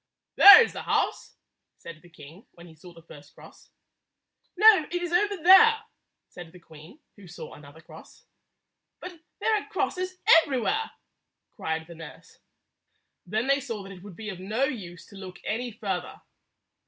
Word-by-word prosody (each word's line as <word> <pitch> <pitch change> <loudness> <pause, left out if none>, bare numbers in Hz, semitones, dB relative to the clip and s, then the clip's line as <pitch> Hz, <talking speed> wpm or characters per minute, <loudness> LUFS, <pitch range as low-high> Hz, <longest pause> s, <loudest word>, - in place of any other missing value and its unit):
"There 405 +3 +9
is - - -6
the - - -7
house," - - -3 0.4
said 160 -2 -13
the 175 - -20
king 160 +4 -16
when 170 - -16
he 165 - -16
saw 165 +3 -16
the 165 -1 -18
first 145 -3 -17
cross. - - -18 0.9
"No; 420 -5 +5
it 355 - -7
is 350 - -5
over 405 +2 0
there," 440 +7 +5 0.4
said 175 -2 -13
the 180 - -16
queen, 160 - -17 0.2
who 200 -2 -16
saw 175 - -11
another 145 +2 -16
cross. - - -17 0.7
"But 360 -2 -11 0.2
there 445 - 0
are - - -17
crosses 370 -2 -4 0.3
everywhere!" 305 - -3 0.7
cried 160 0 -5
the 170 - -13
nurse. 160 -2 -14 0.9
Then 215 +5 -2
they 275 +1 +1
saw 230 -7 -7
that 195 - -12
it 185 -2 -13
would 200 -2 -13
be 215 +2 -9
of 190 -3 -9
no 215 +7 -3
use 195 -11 -6
to - - -18
look 185 -2 -11
any 240 +3 -4
further. 195 -5 -6
205 Hz, 165 wpm, -25 LUFS, -, 0.9 s, There